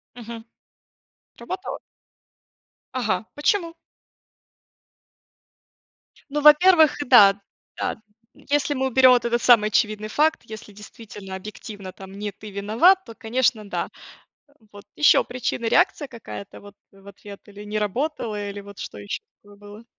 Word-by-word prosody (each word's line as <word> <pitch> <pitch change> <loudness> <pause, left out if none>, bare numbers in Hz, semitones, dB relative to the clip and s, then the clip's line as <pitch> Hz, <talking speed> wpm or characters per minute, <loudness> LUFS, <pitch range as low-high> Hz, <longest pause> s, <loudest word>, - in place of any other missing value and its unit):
Мгм. 230 -1 -9 0.9
Сработало? 375 +1 -6 1.1
Ага, 215 -6 -1
почему? 335 +3 0 2.6
Ну, 295 +1 -2
во-первых, 315 +1 +6
да 205 -5 +7 0.4
да, - - -2 0.4
если 290 0 -1
мы 265 0 0
уберем 260 0 +5
вот 245 -1 +3
этот 235 0 0
самый 225 -4 +5
очевидный 215 0 0
факт, 310 +7 +1
если 220 -2 -11
действительно 205 -2 -11
объективно 205 0 -9
там 190 -1 -12
не 205 +1 -5
ты 205 +1 -12
виноват, 225 - +3
то, 230 - -12
конечно, 225 -2 -1
да. - - -3 0.6
Эм, 285 -7 -29
вот 205 0 -13
еще 300 - +5
причина, 245 -1 -4
реакция 320 +3 +2
какая-то 225 -4 -10
вот 205 0 -14 0.2
в 195 0 -20
ответ, 200 0 -12
или 205 0 -11
не 210 +1 -3
работала, 215 -1 -3
или 200 0 -7
вот 200 0 -13
что - - -8
еще 100 0 -5 0.2
такое 205 0 -18
было? 205 +2 -13
220 Hz, 130 wpm, -23 LUFS, 205-260 Hz, 2.6 s, да